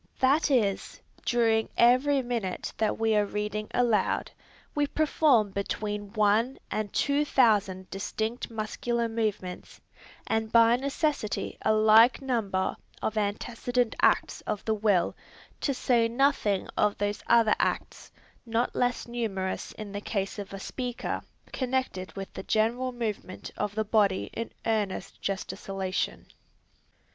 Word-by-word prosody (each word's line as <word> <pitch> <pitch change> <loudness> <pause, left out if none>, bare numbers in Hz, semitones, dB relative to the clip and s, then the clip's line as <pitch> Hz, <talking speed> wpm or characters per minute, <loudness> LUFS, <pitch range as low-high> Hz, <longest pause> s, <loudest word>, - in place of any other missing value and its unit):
That 275 +5 +3
is, 215 -8 0 0.3
during 225 -2 +2
every 260 +3 +4
minute 230 -7 -3
that 220 -1 +1
we 225 -1 +2
are 210 - +4
reading 210 +1 -3
aloud, 230 -5 +1 0.4
we 290 -1 +1
perform 285 -8 +3
between 205 +1 -3
one 215 +4 +2
and 215 -1 -2
two 285 +1 +2
thousand 205 -9 +2
distinct 220 +4 -3
muscular 230 +1 -2
movements, 215 -5 -3 0.5
and 220 0 -1
by 230 0 +6
necessity 280 -3 -1
a - - +2
like 220 +3 +6
number 225 -8 -1 0.3
of 220 - -1
antecedent 230 +3 -1
acts - - +2
of 210 -2 -3
the 220 - +2
will, 205 -4 +2 0.4
to 285 - 0
say 245 -3 +2
nothing 235 -5 +1
of 210 -1 +2
those 205 0 -2
other 230 -2 +5
acts, - - -2 0.3
not 230 +1 -1
less 245 0 0
numerous 210 -6 -3
in 215 -2 -8
the 200 0 -5
case 200 -1 -3
of 200 - -7
a 195 - -6
speaker, 250 +4 -4 0.3
connected 255 -8 -2
with 195 -1 -7
the - - -6
general 235 +6 +1
movement 220 -6 -5
of 205 0 -3
the 220 0 0
body 205 -3 +2
in 230 - -4
earnest 205 -3 -2
gesticulation. 195 -1 -3
220 Hz, 130 wpm, -28 LUFS, 205-245 Hz, 0.5 s, by